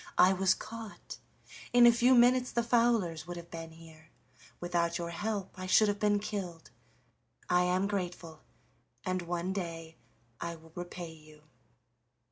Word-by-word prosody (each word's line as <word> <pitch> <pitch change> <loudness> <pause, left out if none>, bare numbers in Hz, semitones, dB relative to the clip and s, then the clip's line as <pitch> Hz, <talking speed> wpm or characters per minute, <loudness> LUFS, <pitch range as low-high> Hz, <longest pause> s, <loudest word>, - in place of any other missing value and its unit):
I 185 +1 +6
was 190 0 +3
caught; 225 -1 -9 0.5
in 245 -1 +8
a 240 - +9
few 245 +2 +4
minutes 250 +1 +5
the 235 - 0
fowlers 230 -9 +1
would 175 0 -6
have 170 0 -10
been 165 -1 -7
here 160 -1 -16 0.5
without 175 -1 0
your 170 -1 -4
help 205 +1 -3
I 185 - -5
should 210 +3 +5
have 205 0 -1
been 210 -1 +3
killed. 195 -5 -5 0.8
I 180 0 +3
am 180 +2 +1
grateful, 180 -5 -4 0.6
and 185 -1 -1
one 175 +2 -3
day 165 -4 -6 0.4
I 170 0 -4
will 160 0 -17
repay 175 -1 -7
you." 155 -1 -17
180 Hz, 150 wpm, -31 LUFS, 170-210 Hz, 0.8 s, a